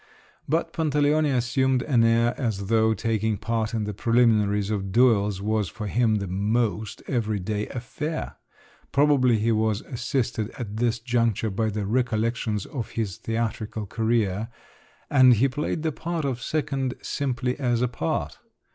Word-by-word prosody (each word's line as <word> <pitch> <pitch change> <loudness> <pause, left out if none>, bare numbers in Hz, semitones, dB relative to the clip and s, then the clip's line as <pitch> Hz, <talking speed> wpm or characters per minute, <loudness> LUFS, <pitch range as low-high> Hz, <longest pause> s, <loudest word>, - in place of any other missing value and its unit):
But 165 +2 0
Pantaleone 150 -1 +2
assumed 130 +1 +1
an 125 -6 +3
air 115 +1 +3
as 105 -6 -3
though 110 -1 +3
taking 110 -1 0
part 115 +2 -2
in 110 - -1
the 105 0 -3
preliminaries 105 -3 +2
of 100 -2 -2
duels 105 -4 +3
was 105 -3 0
for 105 +6 -7
him 110 +1 +2
the 100 -2 -1
most 105 +2 -1
everyday 105 -3 -1
affair: 150 +6 -5 0.5
probably 135 -5 +4
he 110 +2 +1
was 110 -1 +1
assisted 120 -4 -2
at 110 -4 -5
this 120 0 +1
juncture 115 -3 0
by 110 +3 0
the 105 -1 -3
recollections 115 -2 0
of 125 -6 -5
his 105 -5 -2
theatrical 110 -1 -3
career, 110 -1 0 0.6
and 130 -3 +7
he 125 +6 +3
played 150 +3 -3
the 160 - +1
part 165 0 -3
of 130 -3 -2
second 135 -3 -2
simply 125 -2 -1
as 120 -3 +1
a - - +3
part. 80 -9 -3
115 Hz, 145 wpm, -25 LUFS, 105-125 Hz, 0.6 s, and